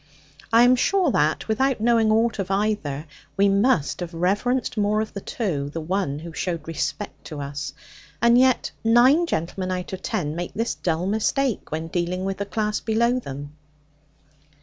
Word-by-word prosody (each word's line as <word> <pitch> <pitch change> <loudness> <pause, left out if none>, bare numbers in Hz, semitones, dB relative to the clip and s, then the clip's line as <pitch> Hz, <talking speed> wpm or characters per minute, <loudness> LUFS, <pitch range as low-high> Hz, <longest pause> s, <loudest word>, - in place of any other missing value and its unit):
I 230 +1 +7
am 250 +1 +6
sure 360 +4 +2
that, 155 -6 +1
without 260 +4 +1
knowing 225 -1 +3
aught 225 0 +2
of 190 - -2
either, 195 -8 -1 0.3
we 200 +1 +4
must 200 - +2
have 175 -1 -6
reverenced 205 +9 0
more 210 0 +1
of 220 - -3
the 200 - -5
two 155 - -2
the 165 - -5
one 165 -3 -1
who 165 +2 -8
showed 165 -1 -3
respect 155 -2 -4
to 150 - -7
us. 140 0 -5 0.5
And 235 +2 +5
yet 255 0 +3
nine 255 +9 +5
gentleman 185 - -2
out 185 0 -4
of 190 - -5
ten 150 -2 -2
make 175 +1 -5
this 230 +3 -1
dull 170 0 -1
mistake 220 +5 0
when 160 +1 -2
dealing 175 +2 -2
with 195 -1 -2
the 200 - -4
class 210 0 -1
below 235 +3 +1
them! 145 - -8
195 Hz, 170 wpm, -24 LUFS, 165-230 Hz, 0.5 s, I